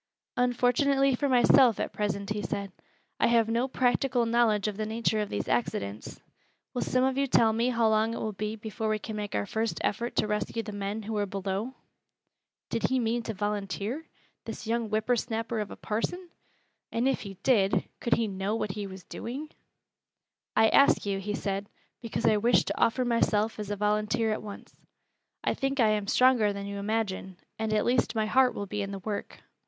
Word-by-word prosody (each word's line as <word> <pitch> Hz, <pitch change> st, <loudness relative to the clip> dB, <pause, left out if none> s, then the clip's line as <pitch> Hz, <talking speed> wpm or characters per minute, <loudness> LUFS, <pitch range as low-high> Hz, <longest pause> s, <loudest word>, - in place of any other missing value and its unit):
"Unfortunately 250 Hz, +3 st, +3 dB
for 280 Hz, +3 st, 0 dB
myself, 250 Hz, -2 st, +5 dB
at -, -, -2 dB
present," 200 Hz, -1 st, -2 dB
he 210 Hz, 0 st, -1 dB
said, 200 Hz, +1 st, -3 dB, 0.5 s
"I -, -, +4 dB
have 230 Hz, -1 st, +4 dB
no 235 Hz, +3 st, +1 dB
practical 250 Hz, -1 st, +1 dB
knowledge 230 Hz, -3 st, +2 dB
of 210 Hz, -, -2 dB
the 215 Hz, +1 st, -3 dB
nature 220 Hz, 0 st, 0 dB
of 210 Hz, -, -2 dB
these 100 Hz, -, -3 dB
accidents. 105 Hz, -3 st, -2 dB, 0.5 s
Will 245 Hz, -, -2 dB
some 255 Hz, 0 st, +1 dB
of 265 Hz, +1 st, +1 dB
you 275 Hz, -, +2 dB
tell 225 Hz, -3 st, +4 dB
me 230 Hz, +3 st, +1 dB
how 235 Hz, -2 st, +2 dB
long 220 Hz, +1 st, +2 dB
it -, -, -4 dB
will 220 Hz, -, -2 dB
be 210 Hz, +2 st, -4 dB
before 220 Hz, 0 st, -4 dB
we 215 Hz, -, +1 dB
can 215 Hz, +1 st, -6 dB
make 210 Hz, -1 st, -4 dB
our 100 Hz, -, 0 dB
first 220 Hz, -, -2 dB
effort 235 Hz, +4 st, -1 dB
to -, -, +2 dB
rescue 210 Hz, +2 st, -2 dB
the 215 Hz, -, -6 dB
men 205 Hz, +2 st, -4 dB
who 220 Hz, +1 st, -4 dB
are 205 Hz, -1 st, 0 dB
below?" 195 Hz, +6 st, -3 dB, 1.0 s
Did 230 Hz, -, -1 dB
he 260 Hz, -, +2 dB
mean 235 Hz, 0 st, 0 dB
to 225 Hz, -1 st, -5 dB
volunteer 205 Hz, -, -3 dB, 0.4 s
this 225 Hz, 0 st, -6 dB
young 230 Hz, 0 st, -1 dB
whipper 220 Hz, +3 st, +1 dB
snapper 225 Hz, -1 st, -2 dB
of 210 Hz, -1 st, -3 dB
a -, -, -8 dB
parson? 350 Hz, -, -3 dB, 0.6 s
And 235 Hz, +3 st, +1 dB
if 270 Hz, -, +1 dB
he 195 Hz, -2 st, -7 dB
did, 205 Hz, -7 st, +3 dB
could 235 Hz, -, +2 dB
he 230 Hz, -, 0 dB
know 195 Hz, +2 st, -2 dB
what 210 Hz, -3 st, -2 dB
he 205 Hz, 0 st, -5 dB
was 190 Hz, -1 st, -10 dB
doing? 280 Hz, +6 st, -6 dB, 1.0 s
"I 220 Hz, 0 st, +5 dB
ask 280 Hz, -, +5 dB
you," 200 Hz, -1 st, -1 dB
he 205 Hz, +2 st, -3 dB
said, 200 Hz, -1 st, -3 dB, 0.3 s
"because 230 Hz, 0 st, -3 dB
I 215 Hz, -, +5 dB
wish 235 Hz, +4 st, +4 dB
to -, -, -3 dB
offer 250 Hz, +2 st, +3 dB
myself 225 Hz, -2 st, +1 dB
as 210 Hz, -1 st, -4 dB
a 205 Hz, -, -1 dB
volunteer 210 Hz, +2 st, +1 dB
at -, -, -4 dB
once; 205 Hz, -1 st, -10 dB, 0.7 s
I -, -, +1 dB
think 270 Hz, 0 st, -2 dB
I 225 Hz, -3 st, +5 dB
am 210 Hz, -2 st, 0 dB
stronger 250 Hz, -3 st, +4 dB
than 200 Hz, 0 st, -5 dB
you 200 Hz, 0 st, -5 dB
imagine, 200 Hz, -3 st, -2 dB, 0.2 s
and 220 Hz, -1 st, -1 dB
at 215 Hz, -1 st, +2 dB
least 245 Hz, 0 st, +1 dB
my 220 Hz, -1 st, +1 dB
heart 255 Hz, +3 st, +3 dB
will 200 Hz, -, -3 dB
be 210 Hz, +1 st, -3 dB
in 200 Hz, -, -3 dB
the 200 Hz, -, -5 dB
work. 205 Hz, +1 st, -5 dB
220 Hz, 200 wpm, -28 LUFS, 205-240 Hz, 1.0 s, myself